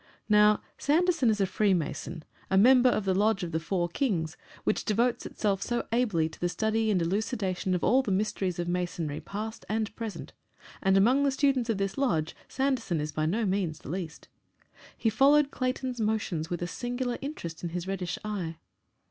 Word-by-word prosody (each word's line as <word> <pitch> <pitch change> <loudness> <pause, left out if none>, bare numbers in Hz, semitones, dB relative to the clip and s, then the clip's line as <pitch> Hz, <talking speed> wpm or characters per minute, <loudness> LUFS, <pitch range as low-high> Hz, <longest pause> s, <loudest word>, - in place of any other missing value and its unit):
Now, 210 0 +5 0.2
Sanderson 325 -3 +3
is 215 -1 +1
a 195 - +3
Freemason, 170 -5 -1 0.3
a 190 - +3
member 250 +4 +7
of 215 -4 0
the 190 - +2
lodge 205 0 +2
of 170 - -4
the 160 - 0
Four 175 +1 -1
Kings, 170 - -1 0.3
which - - 0
devotes 235 +3 +1
itself 200 -3 -1
so 240 0 -2
ably 215 -10 +2
to 160 - -12
the 175 - 0
study 220 +3 0
and 200 -4 +3
elucidation 190 0 -1
of 180 - -2
all 260 +4 +4
the 260 - -5
mysteries 190 -2 0
of 175 0 -2
Masonry 175 -4 -2
past 220 +3 -6
and 215 0 -1
present, 225 -3 -6 0.5
and 195 -1 +4
among 245 +8 +4
the 280 - +3
students 265 -3 +1
of 225 - +1
this 195 +4 -2
lodge 165 - 0
Sanderson 260 - 0
is 150 0 -3
by 155 +1 -1
no 215 +7 0
means 185 -5 0
the 140 - -8
least. 175 -4 -5 0.7
He 225 - +1
followed 280 +5 +4
Clayton's 255 -1 -2
motions 205 -7 -1
with 175 0 -3
a - - -2
singular 245 +4 -3
interest 220 - -6
in 175 - -3
his 175 +1 -4
reddish 185 -2 -3
eye. 185 -6 -3
205 Hz, 185 wpm, -28 LUFS, 175-240 Hz, 0.7 s, member